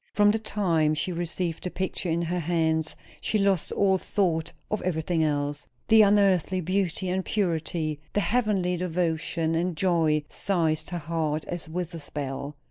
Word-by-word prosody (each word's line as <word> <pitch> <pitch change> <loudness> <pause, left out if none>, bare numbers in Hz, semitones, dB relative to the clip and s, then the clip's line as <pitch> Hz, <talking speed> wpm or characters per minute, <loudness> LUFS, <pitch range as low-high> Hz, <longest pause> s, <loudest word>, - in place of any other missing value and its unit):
From 205 0 +5
the 220 - 0
time 170 -8 +1
she 180 - -1
received 170 -1 -3
the 180 - -2
picture 185 -1 -3
in 170 +1 +1
her 175 +2 -1
hands 160 -1 0 0.3
she 215 - +1
lost 195 -4 +1
all 190 -2 +3
thought 170 -6 0 0.2
of 215 - 0
everything 165 -1 0
else. 145 -1 -1 0.2
The 220 0 +8
unearthly 195 -3 +4
beauty 185 +1 -1
and 190 +1 0
purity, 165 -6 -1
the - - +2
heavenly 205 -6 +1
devotion 165 -2 -1
and 170 0 0
joy, 160 -4 +2
seized 160 -5 0
her 175 - -3
heart 155 -1 -2
as 175 -2 -5
with 175 +1 -4
a 165 - -5
spell. 140 -1 -5
170 Hz, 160 wpm, -27 LUFS, 160-190 Hz, 0.3 s, The